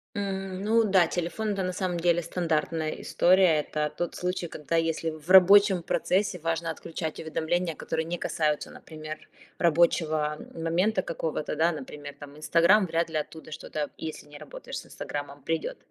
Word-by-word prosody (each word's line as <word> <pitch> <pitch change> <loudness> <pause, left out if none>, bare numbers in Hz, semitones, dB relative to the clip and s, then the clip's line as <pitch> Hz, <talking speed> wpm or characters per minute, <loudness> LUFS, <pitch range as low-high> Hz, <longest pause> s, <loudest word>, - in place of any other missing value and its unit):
М. 195 -1 -3
Ну 225 +2 +3
да, 190 -5 +4
телефон- 180 +6 -2
это, 195 -1 -2
на 185 - -1
самом 180 -1 -2
деле, 175 0 +2
стандартная 160 -2 -1
история. 180 -3 +4
Это 150 0 -2
тот 175 - -3
случай, 180 -1 -2
когда, 155 0 -4
если 165 0 0
в 155 +2 -10
рабочем 190 0 +7
процессе 190 +2 0
важно 165 +1 -2
отключать 160 -1 -5
уведомления, 165 +1 -1
которые 160 +1 -3
не 175 +1 -3
касаются, 150 -3 -1
например, 155 -1 -9 0.3
рабочего 155 -2 +2 0.2
момента 180 +5 +1
какого-то, 160 -3 -3
да. 165 +2 +3
Например, 145 -1 -8
там, 145 0 -11
Инстаграмм- 170 +6 +4
вряд 165 +1 0
ли 155 - -2
оттуда 155 +1 -6
что-то, 150 -1 -4
если 155 -2 -7
не 145 0 -12
работаешь - - -8
с - - -12
Инстаграммом, 145 -1 -7
придет. 165 +1 -2
165 Hz, 160 wpm, -27 LUFS, 155-180 Hz, 0.3 s, рабочем